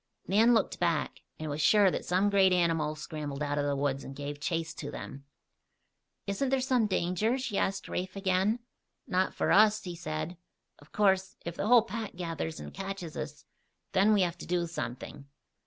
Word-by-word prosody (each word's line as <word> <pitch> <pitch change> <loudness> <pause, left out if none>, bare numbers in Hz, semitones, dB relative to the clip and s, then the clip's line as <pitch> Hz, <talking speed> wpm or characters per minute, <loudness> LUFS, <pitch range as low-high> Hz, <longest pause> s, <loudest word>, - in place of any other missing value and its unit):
Nan 225 +5 +5
looked 220 - 0
back, 170 -4 0 0.2
and 155 - -5
was 145 +2 -2
sure 200 +3 +5
that - - -3
some 190 +3 +2
great 195 -2 +5
animal 165 -4 +2
scrambled 150 -2 -5
out 145 0 -1
of 145 - 0
the 140 - 0
woods 140 -1 -1
and 135 - -8
gave 145 +1 -5
chase 165 +1 -2
to - - -6
them. 140 0 -8 1.0
"Isn't 200 +7 -1
there 270 0 +2
some 255 -4 +2
danger?" 195 +6 +1
she 255 -5 -4
asked 195 0 0
Rafe 185 +1 -4
again. 195 +4 +1 0.4
"Not 185 +1 0
for - - +1
us," 215 +1 +5
he 175 -2 -5
said. 155 +1 -4 0.4
"Of 145 - -19
course, 190 -2 +2
if 170 0 -4
the 205 - -2
whole 240 -1 +7
pack 225 -2 -5
gathers 165 -2 -4
and - - -8
catches 195 -4 -6
us, 150 -1 -6 0.5
then 195 +3 +4
we 205 -3 +4
have 175 -1 -2
to - - -8
do 175 0 +1
something." 140 -2 -6
180 Hz, 190 wpm, -30 LUFS, 155-200 Hz, 1.0 s, whole